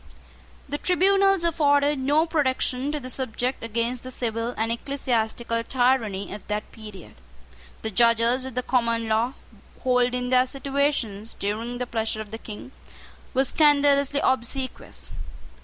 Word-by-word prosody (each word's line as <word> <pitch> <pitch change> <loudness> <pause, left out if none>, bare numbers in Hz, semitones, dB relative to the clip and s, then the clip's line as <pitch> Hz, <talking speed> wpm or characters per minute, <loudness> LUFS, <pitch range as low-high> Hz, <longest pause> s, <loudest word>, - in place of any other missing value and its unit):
The 290 +2 -3
tribunals 390 +1 +3
afforded 290 -3 +3
no 290 +5 +3
protection 270 -3 0
to 300 - -2
the 255 - -8
subject 255 0 -2
against 230 +2 -2
the 255 - -7
civil 235 -1 -2
and 225 +1 0
ecclesiastical 235 -2 -1
tyranny 240 -7 +1
of 210 - -9
that 210 0 -3
period. 210 -5 -11 0.7
The 220 - -3
judges 235 +3 +3
of 260 -2 -7
the 250 - -1
common 230 -3 +1
law, 225 +4 +1 0.5
holding 250 0 +1
their 255 0 +4
situations 270 -6 -1
during 225 +4 -3
the 250 - -2
pleasure 225 -2 -2
of 215 -2 -7
the 225 - -6
King, 220 +4 -9 0.6
were 265 +1 +3
scandalously 285 -2 +3
obsequious. 260 +1 -2
250 Hz, 135 wpm, -25 LUFS, 230-280 Hz, 0.7 s, their